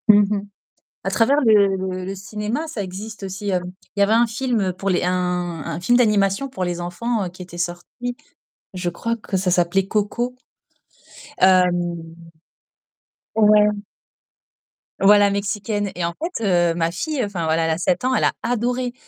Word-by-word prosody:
Mmh 205 0 +6
mh. 200 - -3 0.6
À 195 - -1
travers 230 +9 +3
le 205 -6 +4
le 185 -1 -4
le 190 +1 -4
cinéma, 210 +9 -4
ça 275 -9 -5
existe 200 +3 -7
aussi, 195 +1 -4
heu. 180 - +2 0.4
Il - - -1
y - - +6
avait 205 - +1
un 235 +2 +5
film 230 -5 -1
pour 195 +2 -4
les 180 -2 +1
un 180 - +1 0.5
un 165 - -4
film 240 +7 +3
d'animation 210 +1 +2
pour 190 -8 -3
les 175 -1 -3
enfants 200 +4 -2
qui 180 +1 -11
était 175 -1 -10
sorti. 175 +8 -4 0.6
Je 180 -2 -3
crois 230 +7 -2
que 210 -3 -4
ça 185 0 0
s'appelait 180 +2 +2
Coco. 220 +4 -1 1.1
Hem. 175 -3 +2 1.2
Ouais. 210 -1 +5 1.3
Voilà 205 +1 +6
mexicaine. 205 0 -2
Et 175 -1 -1
en 170 - -2
fait, 335 -8 -3
heu, 175 -3 +3
ma 165 0 0
fille 280 - -2
enfin 195 -6 -3
voilà 160 +1 +1
elle 165 - +1
a 160 - 0
7 180 +3 0
ans, 260 - +2
elle - - +1
a - - +3
adoré 245 +1 -1
200 Hz, 170 wpm, -21 LUFS, 180-225 Hz, 1.3 s, Mmh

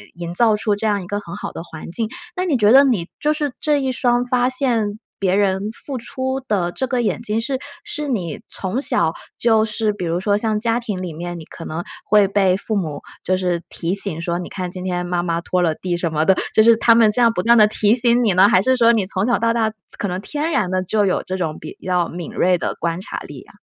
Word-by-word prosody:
营 170 0 -6
造 220 +3 +4
出 210 0 0
这 220 +2 -2
样 205 -2 0
一 - - -10
个 205 +2 -2
很 170 -4 -9
好 - - -6
的 - - -7
环 160 -1 -9
境。 220 +4 -2 0.3
那 365 0 -1
你 310 -7 +1
觉 210 -2 +4
得 270 +3 +8
你， 210 -11 +1
就 300 0 +1
是 295 -3 -2
这 295 -2 +1
一 265 -1 0
双 245 -1 +1
发 250 0 +2
现 235 -6 0 0.2
别 190 -1 +1
人 200 +1 +1
付 265 +3 -6
出 260 +2 -3
的 180 -5 0
这 260 +9 -3
个 255 -2 0
眼 230 - -1
睛， 225 -1 -1
是 260 +3 -2 0.2
是 300 -1 -4
你 185 - -3
从 190 +6 -2
小 165 - +2 0.2
就 220 -2 +3
是 215 0 0
比 205 -3 -5
如 170 +1 -1
说 205 +2 +1
像 215 0 0
家 230 +1 +1
庭 210 -6 -4
里 180 -2 -4
面， 175 +2 -6
你 160 - -10
可 165 - -10
能 160 +2 -4 0.3
会 210 -1 +5
被 195 -2 +2
父 215 +2 -3
母， 160 -7 -3 0.2
就 185 - +1
是 180 -2 -1
提 170 +1 -3
醒 195 -5 0
说： 170 +1 -2
“你 180 - -5
看 180 -2 -5
今 180 0 -7
天 180 -1 -2
妈 175 0 -1
妈 170 -1 -1
拖 180 +1 0
了 165 -3 +1
地 175 0 -3
什 170 -2 -2
么 155 0 +1
的。 190 - +5 0.2
“就 220 - +6
是 230 +1 +7
他 230 0 +5
们 225 -2 +5
这 245 - 0
样 235 -1 +5
不 180 - -1
断 235 +2 +5
地 215 -1 +7
提 210 0 +2
醒 240 0 +3
你 215 -5 +3
呢， 185 +2 +6
还 185 - +4
是 260 +5 +2
说 235 -1 +5
你 220 -4 +1
从 190 +1 -1
小 240 0 +2
到 230 +1 +2
大 225 -2 +1 0.3
可 205 - -2
能 180 0 -3
天 300 +8 -3
然 210 - +1
的， 185 0 +1
就 205 +3 +1
有 185 - +1
这 185 - -4
种 160 -4 -3
比 155 - -9
较 180 -2 +1
敏 170 -1 -7
锐 180 0 +2
的 - - -3
观 170 +1 -3
察 - - -6
力 - - -10
啊？ - - -20
205 Hz, 280 characters per minute, -20 LUFS, 180-235 Hz, 0.3 s, 得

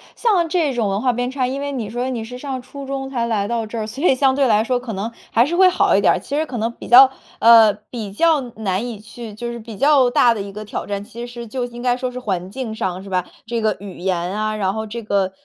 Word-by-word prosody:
像 370 -8 +2
这 315 -6 +1
种 225 -4 0
文 195 +2 -1
化 250 -2 +2
偏 245 +1 -2
差 260 -1 -1
因 270 +2 -3
为 285 0 -3
你 230 -6 -4
说 245 +3 -2
你 235 -3 -3
是 250 +2 -8
上 265 -2 -4
初 275 +2 -9
中 270 0 -4
才 240 -3 -1
来 215 -3 0
到 230 0 -1
这 230 +2 -7
儿， 215 - -2
所 255 +9 -7
以 265 - +5
相 265 0 +3
对 275 -1 +2
来 215 -1 +3
说 250 +1 0
可 240 -3 -6
能 205 +4 -3 0.2
还 235 +2 +4
是 340 +4 -2
会 375 0 +6
好 365 - +3
一 - - +3
点 - - +5
儿。 - - -1
其 280 - -5
实 310 +1 +1
可 250 -5 -6
能 225 +2 -1
比 - - -11
较 260 +2 +9 0.3
呃， 225 -2 +8 0.2
比 220 -5 -5
较 315 +6 +3
难 220 -4 -3
以 225 -4 -6
去 220 0 -10
就 235 +2 -5
是 235 - -6
比 220 -2 -10
较 275 -3 +4
大 240 -1 +4
的 210 - -4
一 200 0 -7
个 210 +1 -8
挑 - - -5
战， 200 0 -4
其 235 +3 -8
实 240 -1 -8
就 245 +2 -3
应 240 0 -9
该 245 -1 +2
说 255 0 -3
是 250 - -6
环 190 -6 -3
境 235 -1 -5
上， 190 -4 -3
是 195 - -10
吧？ 180 -1 0 0.2
这 230 0 -2
个 215 -2 +1
语 195 -2 -9
言 185 -1 0
啊， 210 +5 -2
然 195 -2 0
后 220 0 -4
这 230 +2 -6
个 200 -3 0
235 Hz, 305 characters per minute, -20 LUFS, 210-260 Hz, 0.3 s, 较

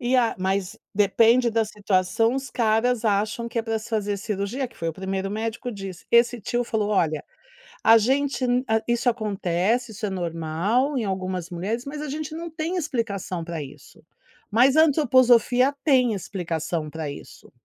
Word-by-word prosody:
E, 250 +1 +1
a 240 -2 +2
mas 190 0 -1 0.2
depende 230 +5 +4
da 225 0 +1
situação 205 +2 +1
os 270 -1 -4
caras 230 +1 +1
acham 215 +2 0
que 235 - -3
é - - +1
para 225 -1 -2
se 220 - -10
fazer 210 -3 -1
cirurgia, 210 +6 -3
que 235 - -22
foi 165 - -3
o - - -2
primeiro 190 +2 -3
médico 225 +3 -3
disse, 195 -3 -8
esse 235 0 +4
tio 240 +4 -1
falou: 215 -3 -1
"Olha, 160 -7 +1 0.6
a 225 - +8
gente 270 +4 0 0.4
isso 240 +1 +1
acontece, 215 0 0
isso 215 +1 -7
é - - -3
normal 180 - -1
em 235 - -1
algumas 185 -3 -3
mulheres, 200 +8 -3
mas 295 +1 -5
a 300 - -5
gente 305 +2 -5
não 335 +1 -6
tem 320 +3 -3
explicação 215 - -3
para 165 -2 -5
isso, 145 +1 -13 0.5
mas 255 +6 +4
a 315 - +8
antroposofia 255 -3 +4
tem 255 -6 +4
explicação 170 -4 -3
para 155 -1 -5
isso." 140 - -12
220 Hz, 170 wpm, -24 LUFS, 190-245 Hz, 0.6 s, a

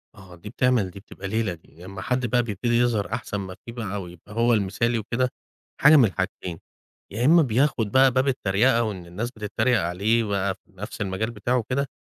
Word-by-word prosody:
آه، 95 -2 -13
دي 95 +5 -10
بتعمل، 120 -6 +1
دي 100 - -10
بتبقى 95 0 -9
ليلة 110 -2 -1
دي. 85 0 -16
لما 95 +1 -8
حد 125 +4 -1
بقى 120 +1 +2
بيبتدي 120 +2 -1
يظهر 115 -5 +1
أحسن 120 -3 -3
ما 95 -2 -6
فيه 115 - -7
بقى 100 -4 -4
ويبقى 90 +3 -12
هو 115 +2 +3
المثالي 110 +3 +1
وكده، 120 +4 -1 0.5
حاجة 150 +3 +8
من 135 -5 +7
الحاجتين: 95 -3 -3 0.5
يا 115 +5 -1
إما 165 +4 +7
بياخد 125 -4 +1
بقى 130 +2 +5
باب 130 +2 +1
التريقة، 120 0 +2
وإن 100 -6 -4
الناس 105 +8 -4
بتتريق 110 +2 0
عليه 100 +7 +1
بقى 100 -2 -1
في - - -39
نفس 105 +3 -7
المجال 105 +3 -2
بتاعه 120 +3 -1
وكده، 130 +4 -1
110 Hz, 195 wpm, -24 LUFS, 95-120 Hz, 0.5 s, حاجة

